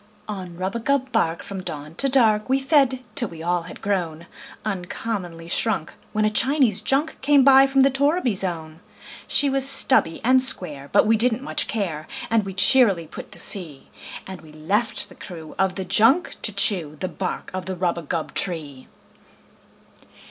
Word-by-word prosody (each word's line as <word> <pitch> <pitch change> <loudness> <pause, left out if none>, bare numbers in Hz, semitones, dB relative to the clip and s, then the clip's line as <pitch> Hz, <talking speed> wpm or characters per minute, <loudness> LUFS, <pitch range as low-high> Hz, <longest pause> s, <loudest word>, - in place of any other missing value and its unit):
On 185 -5 -7
rubagub 235 +8 -2
bark, 165 -6 -1
from 195 -1 -7
dawn 150 -3 -5
to 275 - +1
dark, 225 -4 +2
We 265 +1 +2
fed, 270 -2 +2
till 250 -5 +2
we 165 -1 -10
all 175 +1 0
had - - -12
grown 170 -5 -3 0.4
Uncommonly 180 -3 -5
shrunk, 190 -2 0 0.2
when 215 0 0
a 215 - +1
Chinese 255 -4 +2
junk 275 +8 -1
Came 280 0 +4
by 270 0 +6
from 270 0 +2
the 275 +1 +4
torriby 280 - +1
zone. 165 -4 -2 0.5
She 285 - +3
was 270 0 0
stubby 260 -11 +2
and 255 +2 +4
square, 150 - +1
but - - +4
we 225 +1 +3
didn't 245 +2 +1
much - - +1
care, 170 -8 -4 0.2
And 225 -3 +2
we 195 -1 -7
cheerily 195 -5 +4
put 155 - -11
to - - -2
sea; 160 -9 -2 0.4
And 190 -1 -9
we 155 -2 -16
left 205 +9 -2
the - - -16
crew 165 -4 -11
of 190 -1 +1
the 190 - -4
junk 230 - +2
to 215 - +3
chew 185 -6 +2
The 185 - -3
bark 185 0 -5
of 185 0 -5
the 190 - -3
rubagub 170 -2 -3
tree. 150 -8 -2
200 Hz, 170 wpm, -22 LUFS, 170-260 Hz, 0.5 s, by